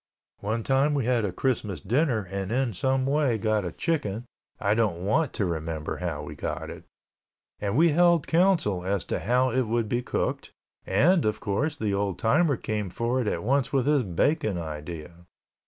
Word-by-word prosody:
One 110 +3 -2
time 135 +4 +2
we 135 -5 0
had 120 -2 +2
a 100 - -2
Christmas 105 - -1
dinner 120 - +1
and 100 0 -3
in 125 -1 0
some 130 +6 0
way 140 -4 +2
got 110 -1 0
a 90 - -3
chicken 120 - -2 0.3
(I 100 0 +2
don't 100 -6 0
want 140 +7 +2
to 100 - 0
remember 80 -2 -3
how 85 -4 -3
we - - -7
got - - -4
it) - - -11 0.7
and 100 +3 -1
we 165 +2 +6
held 170 0 +4
council 165 - +2
as 95 0 -1
to - - -2
how 125 +3 +2
it 130 -1 +1
would 115 0 0
be 120 +3 0
cooked - - -3 0.3
and, 160 - +4
of 105 - 0
course, 145 +10 -1
the 105 -6 -1
old 100 -2 -1
timer 140 +4 +2
came 105 -3 -3
forward 120 +4 -1
at - - -1
once 135 +3 +1
with 135 -3 +1
his 145 -2 +3
bacon 110 - 0
idea. 85 +2 -7
115 Hz, 185 wpm, -26 LUFS, 100-135 Hz, 0.7 s, we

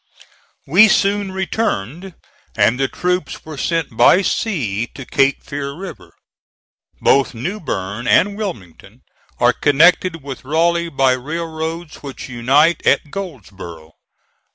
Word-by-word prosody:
We 190 +10 +6
soon 200 -1 +1
returned, 190 - -3 0.4
and 125 +4 +2
the 135 - +2
troops 180 +1 -3
were 155 -1 -8
sent 160 -4 -2
by 150 - +5
sea 120 - -1
to 135 - -8
Cape 135 +1 +1
Fear 140 -1 -5
River. 185 +5 -10 0.9
Both 135 -2 +2
New 180 - -4
Bern 105 - -4
and 205 +1 +3
Wilmington 170 - -8 0.4
are - - +4
connected 165 +2 +3
with 140 -2 -8
Raleigh 170 +4 +1
by 135 -3 +2
railroads 160 +4 -4
which 140 -2 -8
unite 135 +7 +2
at 150 - +2
Goldsboro. 95 - -8
150 Hz, 120 wpm, -18 LUFS, 130-180 Hz, 0.9 s, We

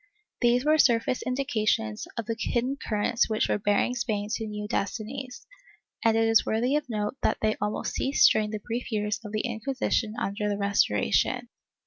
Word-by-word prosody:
^ - - -39 0.4
These 245 +2 +3
were 310 +1 +4
surface 240 -2 +3
indications 215 - -1
of 230 - -2
the 230 +1 -2
hidden 250 +4 0
currents 225 -2 0
which 215 0 +1
were - - 0
bearing 205 +4 +1
Spain 215 -4 -2
to 225 -2 -2
new 210 0 -5
destinies, 240 +6 -4 0.6
and 225 -1 +4
it 225 0 +3
is 225 0 +5
worthy 240 +6 +1
of 300 -3 -1
note 210 +3 -2
that - - +1
they 215 0 +2
almost 210 0 -2
ceased 355 +11 +4
during 215 -1 +1
the 215 - -3
brief 240 +2 -4
years 210 0 -1
of 210 - -7
the 215 0 -1
Inquisition 235 -1 -1
under 210 +1 -2
the 205 - -1
Restoration. 200 - +1
220 Hz, 180 wpm, -27 LUFS, 210-250 Hz, 0.6 s, is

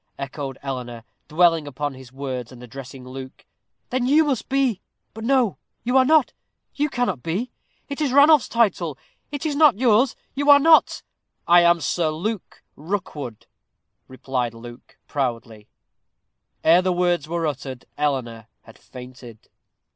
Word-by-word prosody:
echoed 135 -1 -6
Eleanor, 125 -4 -6 0.2
dwelling 165 -1 +3
upon 145 +1 -4
his 130 -2 -13
words, 130 -3 -5
and 125 -1 -12
addressing 130 +1 -10
Luke 130 0 -10 0.5
"then 250 0 0
you 300 +4 +5
must 280 -6 -2
be 265 -7 +1 0.3
but 220 - -9
no, 250 -4 +1 0.2
you 250 +3 -1
are 260 -1 +6
not, 310 -1 +3 0.4
you 295 +1 -1
cannot 240 - -1
be 190 - -3 0.4
it 285 +2 -5
is 285 -4 +1
Ranulph's 285 +1 +5
title 180 - +1 0.3
it 285 +2 -5
is 300 -2 -1
not 295 -6 +5
yours 240 +1 +3 0.2
you 285 +2 -1
are 285 - +10
not 315 +2 +4 0.2
" - - -51
"I - - +8
am 170 0 +4
Sir 160 +2 0
Luke 190 +6 -5
Rookwood," 150 - -5 0.6
replied 130 -2 -3
Luke, 120 +1 -13
proudly. 115 -6 -4 1.0
Ere 170 +3 +6
the 185 0 0
words 175 -4 0
were 170 -1 -1
uttered 135 -3 -5
Eleanor 125 -7 -2 0.2
had 115 - -17
fainted. 125 -3 -13
160 Hz, 145 wpm, -22 LUFS, -, 1.0 s, are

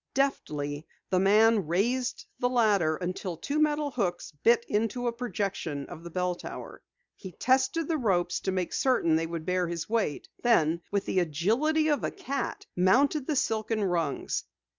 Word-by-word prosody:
Deftly 150 - -1 0.2
the 185 - +3
man 210 0 +4
raised 245 +9 0
the 245 - +2
ladder 205 -10 +3
until 180 +1 -4
two 285 - -2
metal 300 -1 +1
hooks 195 -10 -2
bit 235 0 +4
into 225 +4 -1
a 240 - +2
projection 195 - -3
of 170 -1 -10
the 170 - -7
bell 180 +1 -1
tower. 175 - -9 0.3
He 190 -3 -10
tested 265 - +1
the 320 -2 0
ropes 180 -7 +1
to 190 - -2
make 185 -2 -2
certain 245 -12 +2
they 165 +1 0
would 165 -1 -5
bear 180 0 +1
his 170 -1 -4
weight 215 -10 -1
then, 170 -8 +3
with 200 -1 -1
the 185 - +1
agility 225 - +1
of 295 -2 +1
a - - +1
cat, 275 -1 -4
mounted 260 - +3
the 305 - 0
silken 220 -4 0
rungs. 170 -6 -1
200 Hz, 165 wpm, -28 LUFS, 175-250 Hz, 0.3 s, man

